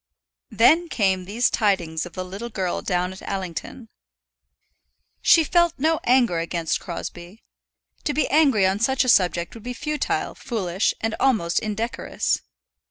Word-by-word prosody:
Then 325 Hz, +9 st, +4 dB
came 190 Hz, -7 st, 0 dB
these 225 Hz, +6 st, +1 dB
tidings 175 Hz, -7 st, 0 dB
of 175 Hz, -, -15 dB
the 185 Hz, -, -5 dB
little 200 Hz, +6 st, -7 dB
girl 190 Hz, -5 st, -2 dB
down 180 Hz, -1 st, -1 dB
at 190 Hz, -, -12 dB
Allington. 195 Hz, +4 st, -5 dB, 1.3 s
She 330 Hz, -, +6 dB
felt 345 Hz, +1 st, +2 dB
no 315 Hz, +3 st, +1 dB
anger 240 Hz, -9 st, +3 dB
against 165 Hz, -1 st, -2 dB
Crosbie. 175 Hz, +3 st, -8 dB, 0.6 s
To 295 Hz, -, 0 dB
be 305 Hz, -, +1 dB
angry 275 Hz, -10 st, +4 dB
on 190 Hz, +2 st, +1 dB
such 265 Hz, +4 st, +2 dB
a -, -, -4 dB
subject 175 Hz, -6 st, +2 dB
would 230 Hz, -, -11 dB
be 250 Hz, +3 st, -5 dB
futile, 300 Hz, +4 st, -2 dB
foolish, 195 Hz, -6 st, -1 dB
and 225 Hz, 0 st, -1 dB
almost 215 Hz, -11 st, +2 dB
indecorous. 220 Hz, +2 st, -2 dB
210 Hz, 145 wpm, -23 LUFS, 180-255 Hz, 1.3 s, She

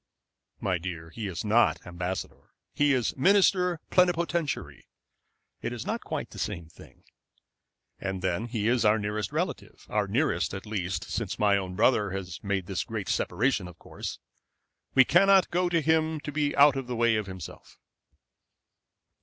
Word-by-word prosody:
"My 90 Hz, -3 st, 0 dB
dear, 80 Hz, -2 st, -6 dB
he 110 Hz, +3 st, -5 dB
is 95 Hz, +2 st, -5 dB
not 115 Hz, +3 st, +3 dB
ambassador. 90 Hz, +1 st, -5 dB, 0.2 s
He 145 Hz, 0 st, +3 dB
is 125 Hz, -4 st, +1 dB
minister 180 Hz, +2 st, +3 dB
plenipotentiary. 170 Hz, -3 st, 0 dB, 0.7 s
It -, -, -3 dB
is -, -, -6 dB
not -, -, -2 dB
quite -, -, -4 dB
the -, -, -9 dB
same 85 Hz, -, -3 dB
thing. -, -, -17 dB, 1.0 s
And 95 Hz, -1 st, -4 dB
then 95 Hz, +5 st, -1 dB
he 110 Hz, -3 st, -2 dB
is 120 Hz, 0 st, +2 dB
our 105 Hz, +1 st, +4 dB
nearest 105 Hz, 0 st, -3 dB
relative, -, -, -4 dB
our 105 Hz, -1 st, 0 dB
nearest, 125 Hz, 0 st, 0 dB
at 95 Hz, -, -7 dB
least, 100 Hz, -4 st, -3 dB
since -, -, -4 dB
my 100 Hz, -1 st, +3 dB
own 95 Hz, -2 st, -3 dB
brother 105 Hz, -1 st, +3 dB
has 95 Hz, -2 st, -6 dB
made 100 Hz, -3 st, -1 dB
this 95 Hz, -1 st, -2 dB
great -, -, -5 dB
separation, 115 Hz, -5 st, 0 dB
of 90 Hz, -, -12 dB
course. -, -, -7 dB, 0.8 s
We 130 Hz, -1 st, +7 dB
cannot 195 Hz, +1 st, +5 dB
go 180 Hz, 0 st, +1 dB
to 170 Hz, -2 st, +2 dB
him 160 Hz, 0 st, +1 dB
to 145 Hz, -, -5 dB
be 145 Hz, 0 st, 0 dB
out 140 Hz, -1 st, +6 dB
of 135 Hz, -2 st, -4 dB
the 125 Hz, -, -3 dB
way 115 Hz, -1 st, +3 dB
of 105 Hz, -2 st, -2 dB
himself." 95 Hz, -2 st, -10 dB
110 Hz, 160 wpm, -28 LUFS, 95-150 Hz, 1.0 s, We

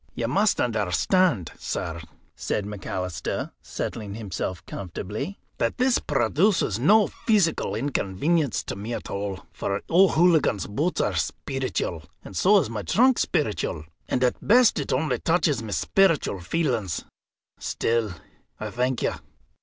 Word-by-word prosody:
"You 115 Hz, -, -1 dB
must 200 Hz, -, +2 dB
understand, 110 Hz, -, +1 dB
sir," 85 Hz, 0 st, -4 dB, 0.3 s
said 105 Hz, -, -2 dB
McAlister, 95 Hz, -4 st, -4 dB
settling 105 Hz, -3 st, -5 dB
himself 95 Hz, -4 st, -4 dB
comfortably, 105 Hz, -, -5 dB, 0.2 s
"that -, -, 0 dB
this 255 Hz, -1 st, +3 dB
produces 140 Hz, -, +1 dB
no 210 Hz, -, +5 dB
pheesical 175 Hz, -, +1 dB
inconvenience 140 Hz, -, 0 dB
to -, -, -5 dB
me 110 Hz, +4 st, -4 dB
at -, -, -7 dB
all. 100 Hz, -1 st, -4 dB
For 100 Hz, 0 st, -3 dB
O'Hooligan's 170 Hz, -, +4 dB
boots 150 Hz, -, -1 dB
are -, -, 0 dB
speeritual, 130 Hz, -, -2 dB, 0.2 s
and 95 Hz, -, -10 dB
so 205 Hz, -, +5 dB
is 175 Hz, -, +2 dB
my 110 Hz, -2 st, -4 dB
trunk 240 Hz, -, +3 dB
speeritual. 100 Hz, -, -1 dB, 0.2 s
And 125 Hz, -, +1 dB
at 125 Hz, -, +2 dB
best 235 Hz, -4 st, +5 dB
it 145 Hz, -, -3 dB
only 145 Hz, +4 st, 0 dB
touches 165 Hz, -6 st, +1 dB
my 110 Hz, -, -7 dB
speeritual 165 Hz, -, +2 dB
feelings. 110 Hz, -, -1 dB, 0.5 s
Still, 115 Hz, -5 st, -1 dB, 0.4 s
I -, -, -4 dB
thank 125 Hz, +1 st, -1 dB
you." -, -, +1 dB
125 Hz, 130 wpm, -25 LUFS, -, 0.5 s, no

